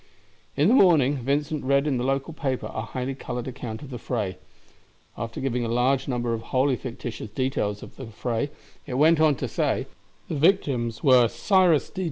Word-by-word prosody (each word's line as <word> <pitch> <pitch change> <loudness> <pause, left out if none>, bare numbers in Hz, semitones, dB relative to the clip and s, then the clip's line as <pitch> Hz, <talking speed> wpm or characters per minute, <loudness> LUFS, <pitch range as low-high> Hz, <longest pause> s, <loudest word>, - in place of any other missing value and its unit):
In 145 +3 +4
the 225 - +5
morning 155 - +5
Vincent 145 +4 -1
read 140 +2 +2
in 140 -4 0
the - - -1
local 135 +4 -1
paper 135 -4 -3
a 110 - -3
highly 125 +3 -4
colored 125 -2 -5
account 120 -2 -6
of 140 - -10
the 125 - -6
fray. 105 -7 -3 0.8
After 115 0 -5
giving 125 -2 -1
a - - -1
large 130 +3 +1
number 120 -3 -1
of 115 - -3
wholly 130 +3 +1
fictitious 115 -3 -6
details 105 -3 -2
of - - -12
the 130 - -7
fray, 115 +4 -2 0.4
it 125 - -4
went 155 +4 +5
on 155 -2 +4
to - - -3
say: - - 0 0.4
"The - - -4
victims 140 - +1
were 130 -4 +6
Cyrus 180 - +2
D. - - -7
130 Hz, 190 wpm, -25 LUFS, 120-145 Hz, 0.8 s, were